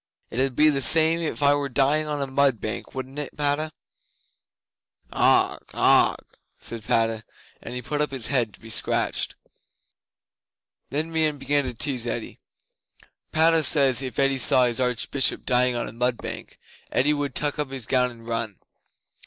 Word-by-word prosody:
It 120 - -4
'ud 130 -1 0
be 155 0 +5
the 135 -1 -1
same 160 +3 +5
if 160 -3 -3
I 140 0 +5
were 145 -1 -2
dying 145 +4 +2
on 145 -2 -2
a - - -2
mud 135 -3 +1
bank, 110 +5 -6
wouldn't 130 +2 -6
it, 145 - -6
Padda?" 150 +2 0 1.4
'"Augh! - - +2 0.2
Augh!" - - +4 0.4
said 115 -2 -7
Padda, 115 0 0 0.4
and 125 -1 -7
put 145 +3 -2
up 150 - 0
his 130 -4 -4
head 120 -6 0
to - - -22
be 115 0 -11
scratched. - - -2 1.5
'Then 155 +4 -3
Meon 155 -2 +1
began 145 +1 0
to 125 -2 -5
tease 125 -1 -1
Eddi: 115 -1 -5 0.9
"Padda 160 +1 +3
says, 135 -4 +4
if 130 -2 -5
Eddi 135 -1 +1
saw 125 0 +6
his 120 0 -1
Archbishop 125 +2 0
dying 125 -1 +3
on 120 - -3
a - - -7
mud 125 +1 -1
bank - - -8 0.3
Eddi 145 +4 +2
would 145 -3 -3
tuck 145 0 -1
up 150 -2 -2
his 135 -4 -4
gown 125 0 +2
and 115 -2 -14
run. 115 -3 -3
135 Hz, 170 wpm, -24 LUFS, 125-145 Hz, 1.5 s, saw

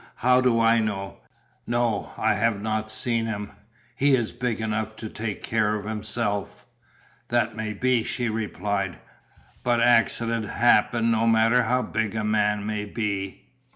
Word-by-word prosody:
How 125 +1 +3
do 125 -2 +3
I 115 0 +4
know? 100 -3 -3 0.5
No, 120 -3 0
I - - +2
have 115 -1 +1
not 110 +1 -2
seen 115 +1 -1
him, 105 -2 -4 0.4
he 140 +1 +4
is 120 -4 -1
big 125 -3 -2
enough 110 0 -2
to 110 0 -7
take 105 -2 -5
care 110 -1 +1
of 105 -1 -5
himself." 105 -2 -3 0.6
"That 120 -2 0
may 110 -1 -3
be," 125 +2 +1
she 120 +1 -2
replied, 100 -3 -2 0.7
"but 120 -1 +2
accidents 115 -1 +2
happen 115 0 +3
no 115 0 +2
matter 115 +2 +4
how 125 0 +1
big 110 -1 -2
a 110 - -1
man 105 -1 +1
may 105 -1 -2
be. 100 -3 -3
110 Hz, 155 wpm, -25 LUFS, 105-115 Hz, 0.7 s, I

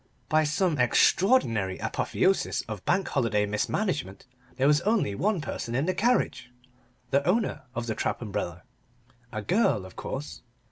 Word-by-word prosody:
By 155 0 +3
some 155 0 0
extraordinary 120 - +3
apotheosis 195 +1 0
of 110 -4 -7
Bank 190 +1 +1
Holiday 115 -6 +1
mismanagement, 105 - -2 0.3
there 130 +1 +1
was 150 +2 +4
only 210 - +1
one 190 - 0
person 120 -5 -4
in 135 +4 +1
the 185 - +1
carriage 230 - +1 0.6
the 140 +1 +3
owner 185 - 0
of 120 0 -2
the 115 - -2
trap 110 - -2
umbrella. 100 -6 -4 0.7
A 110 -1 -4
girl, 170 - +2
of 95 - -12
course. 75 +2 -6
135 Hz, 145 wpm, -27 LUFS, -, 0.7 s, was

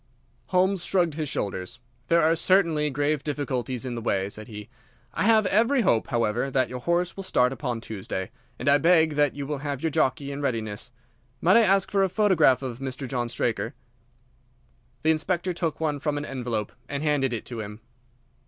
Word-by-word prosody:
Holmes 185 0 +2
shrugged 175 -4 +1
his 155 -1 -3
shoulders. 95 -5 -3 0.3
"There 170 +3 +4
are 160 +1 +4
certainly 165 -4 +3
grave 145 +1 0
difficulties 130 -4 -3
in 125 - -3
the 115 - -4
way," 100 -3 -1
said 110 +1 -7
he. 105 -2 -9 0.5
"I - - 0
have 220 -1 +5
every 235 +7 +3
hope, 115 - +2
however, 115 +2 0
that 130 -1 +1
your 125 - -5
horse 170 +6 0
will 195 - -6
start 125 -9 +2
upon 125 -5 -3
Tuesday, 95 -4 -5 0.3
and 125 - -6
I 140 +1 +6
beg 160 0 +4
that 145 -2 +2
you 140 -1 -4
will 145 0 -3
have 145 -1 -4
your 160 - +1
jockey 140 +1 0
in 140 +1 -5
readiness. 115 -4 -3 0.5
Might 185 - +5
I - - +7
ask 195 -3 +3
for 200 -1 +2
a 190 - +2
photograph 175 - +3
of 125 -2 -5
Mr. 135 0 -5
John 120 -2 -2
Straker?" 115 +2 -2 1.3
The 160 - +4
Inspector 175 +3 -1
took 165 -2 -2
one 150 -3 -1
from 145 0 -1
an 145 - -3
envelope 120 -6 -3 0.2
and 140 +1 -3
handed 145 -4 +1
it 115 - -4
to 120 -2 -6
him. 105 +1 -7
145 Hz, 190 wpm, -26 LUFS, 125-165 Hz, 1.3 s, I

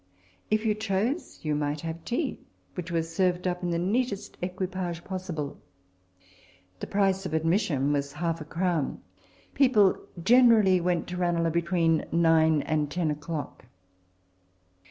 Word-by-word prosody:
If 215 +1 +1
you 215 - +3
chose, 215 - -2
you 155 -1 0
might 145 0 -1
have 165 0 -6
tea, 260 +4 -2 0.3
which 180 -1 -6
was 165 -1 -2
served 180 0 +1
up 180 0 -2
in 175 - -2
the 170 - 0
neatest 205 +4 -1
equi 185 +1 -2
page 175 -2 -4
possible. 175 -7 -5 1.2
The - - -5
price 195 -1 +1
of 160 - -3
admission 160 -4 +1
was 140 0 -2
half 165 +1 -2
a - - -6
crown. 165 -2 -1 0.5
People 220 -8 +4 0.3
generally 225 -6 +6
went 175 -1 0
to 180 - -4
Ranelagh 170 -2 +1
between 170 -2 +1
nine 160 -2 +4
and 150 -2 0
ten 165 0 0
o'clock. 150 -2 -5
175 Hz, 140 wpm, -27 LUFS, 160-190 Hz, 1.2 s, generally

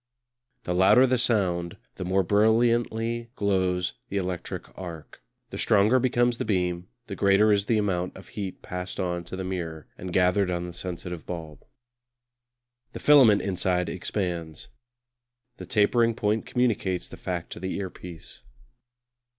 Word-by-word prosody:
The 90 - -2
louder 95 +8 +6
the 130 -1 +1
sound 90 -8 0 0.2
the - - -6
more 95 +1 +1
brilliantly 115 +3 +2
glows 95 -3 0 0.2
the 100 - -2
electric 90 -2 -4
arc; 85 -8 -9 0.3
the - - -6
stronger 105 +6 +4
becomes 120 -1 +1
the - - 0
beam, 90 -4 -1 0.2
the 100 - -6
greater 100 +2 +4
is 100 -1 +2
the 115 - +3
amount 90 -4 -1
of 95 - -13
heat 100 -3 -6
passed 90 0 -6
on 90 -1 -2
to 95 - -7
the 95 - -4
mirror 85 -4 -5
and 90 0 -6
gathered 90 +2 +3
on 90 -1 -2
the 90 - -7
sensitive 90 -1 -6
bulb. 80 -4 -7 1.3
The - - -6
filament 130 -9 +6
inside 90 -2 0
expands. 85 -6 -4 0.9
The 90 - -9
tapering 115 +3 +3
point 105 +1 0
communicates 105 -7 0
the - - -10
fact 90 -2 -5
to - - -7
the 95 +1 -3
earpiece. 90 -3 -8
95 Hz, 145 wpm, -26 LUFS, 90-105 Hz, 1.3 s, louder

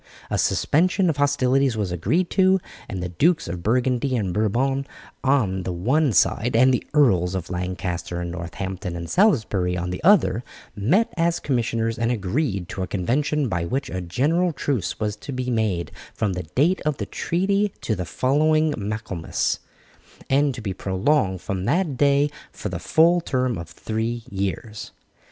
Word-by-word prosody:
A - - +1
suspension 180 +3 +2
of 145 - -7
hostilities 135 -3 +2
was 100 -4 -1
agreed 125 - 0
to, 190 0 +4 0.3
and 95 -5 -4
the 90 - -3
Dukes 155 - +2
of 85 0 -5
Burgundy 125 +5 +1
and 95 -5 -1
Bourbon 130 +7 0 0.4
on 120 -9 +2
the 90 - -3
one 130 - +1
side 115 +3 +2
and 130 +3 +5
the 125 - 0
Earls 95 - +3
of 95 -1 -4
Lancaster, 90 -1 -3
Northampton, 90 +2 -5
and 85 0 -5
Salisbury 105 - +2
on 90 +1 -3
the 90 - -5
other, 125 - +4 0.3
met 150 - +2
as 170 0 +1
commissioners 115 -4 -1
and 115 +1 +1
agreed 100 - -1
to 95 - -5
a 95 - -2
convention 135 - 0
by 85 -6 -1
which 130 +11 -2
a 90 - -3
general 155 - +1
truce 125 - -2
was 105 -1 -1
to 140 - -8
be 130 -1 -2
made 105 -7 0 0.2
from 105 -3 0
the 90 -3 -6
date 170 +8 +3
of 150 -2 -1
the - - -3
treaty 195 +4 0
to 110 - -1
the 90 - -3
following 155 - +2
Michaelmas, 105 -5 -2 0.7
and 140 -1 +3
to 120 - -7
be 100 -3 -3
prolonged 95 - 0
from 95 -1 -3
that 165 - +1
day 145 +1 +3 0.2
for 105 - -5
the 90 -2 -4
full 170 - +4
term 130 -5 0
of 85 -2 -7
three 115 +2 -3
years. 100 +3 -4
115 Hz, 165 wpm, -23 LUFS, 95-145 Hz, 0.7 s, and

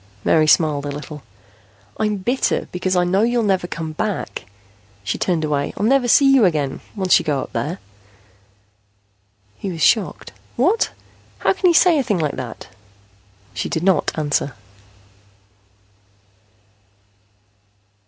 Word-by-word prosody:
Mary 155 -1 +3
smiled 150 -2 +3
a 145 - -4
little. 150 +1 -8 0.8
"I'm 210 -1 0
bitter 245 +7 -1
because 185 +1 -1
I 180 - +3
know 185 +3 +1
you'll 235 +1 +1
never 190 -4 0
come 160 -2 -5
back." 205 +6 -4 0.6
She 100 - -3
turned 170 -4 0
away. 145 -2 -1
"I'll 205 - -1
never 260 +1 +3
see 270 +3 +5
you 265 -4 +5
again, 150 -7 0
once 190 -3 +3
you - - -5
go 145 -3 -1
up - - -9
there." 170 +6 -3 1.8
He 195 - -4
was 165 -3 -3
shocked. 215 -5 +1 0.2
"What? 360 - +2 0.5
How - - +1
can 380 -1 +1
you 340 - +3
say 340 -2 +5
a - - +1
thing 210 -5 0
like 150 -4 -1
that?" 125 -3 -7 0.8
She 95 - -3
did 160 - -2
not 185 -4 +2
answer. 145 -3 -1
180 Hz, 140 wpm, -20 LUFS, 150-220 Hz, 1.8 s, see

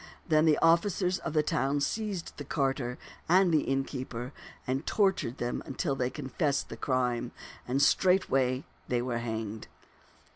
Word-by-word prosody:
Then 155 -2 +4
the 155 -2 +5
officers 180 +2 +3
of 165 - -4
the 155 -1 +3
town 145 -3 0
seized 205 +3 -2
the 145 - -5
carter 135 -3 -1 0.3
and 185 +1 +5
the 155 - +4
innkeeper 130 -2 -3 0.3
and 130 +3 -1
tortured 190 - +1
them 120 0 -2 0.2
till 145 -7 0
they 125 -2 0
confessed 140 +1 -1
the - - -6
crime, 125 -2 -1 0.4
and 130 +2 0
straightway 135 -10 +3 0.2
they 120 -1 0
were 120 -2 -2
hanged. 110 -2 -4
135 Hz, 145 wpm, -30 LUFS, 125-165 Hz, 0.4 s, the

